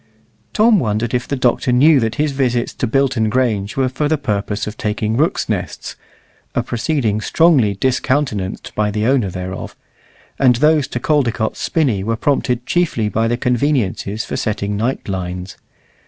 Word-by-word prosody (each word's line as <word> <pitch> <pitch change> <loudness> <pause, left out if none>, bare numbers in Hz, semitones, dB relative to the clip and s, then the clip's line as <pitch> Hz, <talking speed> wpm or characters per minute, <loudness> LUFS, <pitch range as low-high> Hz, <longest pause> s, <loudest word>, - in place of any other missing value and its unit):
Tom 215 -1 +4
wondered 110 -1 -1
if 125 0 -1
the 140 - -1
Doctor 125 -1 +1
knew 140 +4 +5
that 115 -1 -1
his 150 0 0
visits 125 -3 0
to 125 - -2
Bilton 125 -3 +1
Grange 110 -4 0
were 135 -1 +2
for 130 +4 -1
the 155 +1 +1
purpose 105 -5 -2
of 105 - -6
taking 110 0 -2
rooks' 155 +7 +1
nests - - -4 0.6
(a - - +1
proceeding 120 -4 -1
strongly 135 -7 +3
discountenanced 130 -4 -1
by 105 -1 0
the 105 +1 -1
owner 125 -5 +2
thereof), 90 +1 -6 0.6
and 125 -3 +5
those 150 +2 +3
to 125 - -4
Caldecott's 120 -6 0
Spinney 125 -12 0
were 115 +3 -1
prompted 125 -1 0
chiefly 155 -12 0
by 110 +2 0
the 120 +1 0
conveniences 120 -5 0
for - - -4
setting 105 -1 -2
night 115 +6 -2
lines. 90 -1 -4
120 Hz, 160 wpm, -18 LUFS, 105-135 Hz, 0.6 s, knew